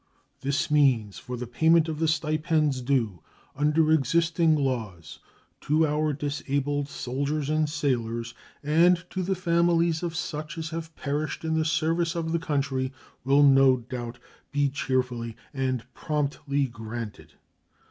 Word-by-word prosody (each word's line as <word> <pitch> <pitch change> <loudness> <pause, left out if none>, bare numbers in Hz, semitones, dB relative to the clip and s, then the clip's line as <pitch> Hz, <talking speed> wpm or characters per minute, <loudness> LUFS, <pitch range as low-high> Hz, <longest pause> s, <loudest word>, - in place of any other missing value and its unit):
The 140 +1 0
means 130 -9 +3
for 125 0 -6
the 125 - -4
payment 160 +7 +3
of 155 -2 -4
the 165 - +2
stipends 155 -3 +1
due 120 - 0 0.3
under 150 +2 +2
existing 165 +2 +3
laws 110 - -3 0.4
to 155 +2 +2
our 150 0 +1
disabled 145 0 -2
soldiers 140 +4 -2
and 155 -1 +1
sailors 115 -6 -1 0.3
and 170 +4 +4
to 185 - -2
the 190 +1 0
families 170 -2 +2
of 170 -2 -3
such 155 -1 -4
as 160 0 -4
have 165 0 -6
perished 150 +3 -3
in 160 - 0
the 160 0 +1
service 165 +2 +1
of 165 -1 -2
the 170 - +1
country 140 -4 -1 0.3
will 140 +3 +4
no 135 -2 +6
doubt 120 0 -6 0.3
be 145 0 +2
cheerfully 125 -4 -2 0.2
and 130 -3 -1
promptly 145 -1 -1
granted. 115 -2 -7
145 Hz, 135 wpm, -26 LUFS, 130-160 Hz, 0.4 s, no